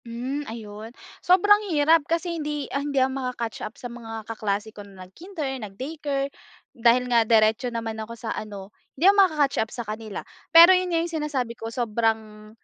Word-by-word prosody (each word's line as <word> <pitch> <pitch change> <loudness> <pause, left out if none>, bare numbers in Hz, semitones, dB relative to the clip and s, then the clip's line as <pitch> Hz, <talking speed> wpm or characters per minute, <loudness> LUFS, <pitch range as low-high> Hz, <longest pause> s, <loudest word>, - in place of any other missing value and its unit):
Hmm, 250 +5 -4
ayun 220 -1 -8 0.3
sobrang 410 +3 +5 0.2
hirap 315 +3 +5
kasi 335 0 -1
hindi 295 -1 -3
hindi 280 0 -2
ako 260 0 +2
maka 250 -1 -3
catch 225 - -8
up 215 - -7
sa - - -12
mga 225 -2 -7
kaklase 215 -1 -3
ko 205 - -10
na 195 -2 -12
nag-kinder, 280 - -6
nag-daycare 275 +6 -4 0.4
dahil 240 +1 +3
nga 240 -2 +3
diretso 220 +2 +3
naman 225 -2 -4
ako 230 +2 -8
sa 225 0 -4
ano 205 -2 -8 0.2
hindi 320 - 0
ako 395 +1 +7
maka-catch 300 -7 +2
up 220 - -2
sa 240 - -6
kanila. 215 0 -6 0.2
Pero 335 +3 +9
yun 365 0 +1
nga 335 -1 +1
yung 335 -1 -6
sinasabi 265 -6 -2
ko 225 -1 -7
sobrang 220 -2 -2
240 Hz, 180 wpm, -24 LUFS, 220-295 Hz, 0.4 s, Pero